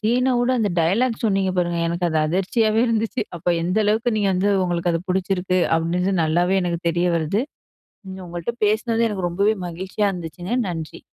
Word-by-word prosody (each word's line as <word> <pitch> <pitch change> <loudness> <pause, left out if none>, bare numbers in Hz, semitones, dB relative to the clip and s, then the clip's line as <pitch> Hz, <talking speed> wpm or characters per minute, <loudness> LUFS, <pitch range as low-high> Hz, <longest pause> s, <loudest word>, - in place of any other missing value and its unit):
சீன 250 +4 +2
வுட 245 +1 +1
அந்த 215 -3 +1
டயலாக் 220 +9 +2
சொன்னீங்க 195 -4 +1
பாருங்க! 175 -1 0
எனக்கு 170 +1 -2
அது 160 -1 0
அதிர்ச்சியவே 215 +6 +1
இருந்துச்சு. 225 +2 -1
அப்போ 175 +1 -1
எந்த 180 +5 0
அளவுக்கு 220 +4 +1
நீங்க 205 -2 +1
வந்து 190 +2 +1
உங்களுக்கு 175 -1 0
அது 165 - 0
புடிச்சிருக்கு? 185 0 0 0.2
அப்படின்றது 180 +4 0
நல்லாவே 175 +4 +2
எனக்கு 170 -1 -1
தெரிய 175 +1 +1
வருது. 165 +6 0 0.7
நீங்க 190 0 -8
உங்கள்ட்ட 175 +6 -4
பேசினது, 225 +2 +1
எனக்கு 190 -4 -2
ரொம்பவே 200 +5 +1
மகிழ்ச்சியா 190 +4 -2
இருந்துச்சுங்க, 175 +3 -6
நன்றி! 165 -4 -6
185 Hz, 165 wpm, -22 LUFS, 175-215 Hz, 0.7 s, சீன